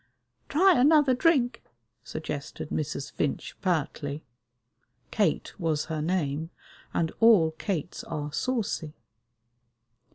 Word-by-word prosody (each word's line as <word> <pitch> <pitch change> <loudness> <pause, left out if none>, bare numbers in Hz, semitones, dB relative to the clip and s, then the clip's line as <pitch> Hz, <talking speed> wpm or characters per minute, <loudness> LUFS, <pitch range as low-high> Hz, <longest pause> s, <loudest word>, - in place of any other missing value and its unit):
"Try 350 -1 +5
another 295 -1 +5
drink," 255 -4 +2 0.4
suggested 150 -2 -6
Mrs. 150 -2 -3
Finch 145 - -2
pertly. 155 -4 -1 0.9
Kate 200 -8 0
was 160 -4 0
her 155 - -2
name, 160 -2 -1 0.4
and 165 -1 0
all 210 -9 +6
Kates 175 0 -4
are 150 -2 -4
saucy. 210 -10 -2
165 Hz, 95 wpm, -27 LUFS, 150-240 Hz, 0.9 s, all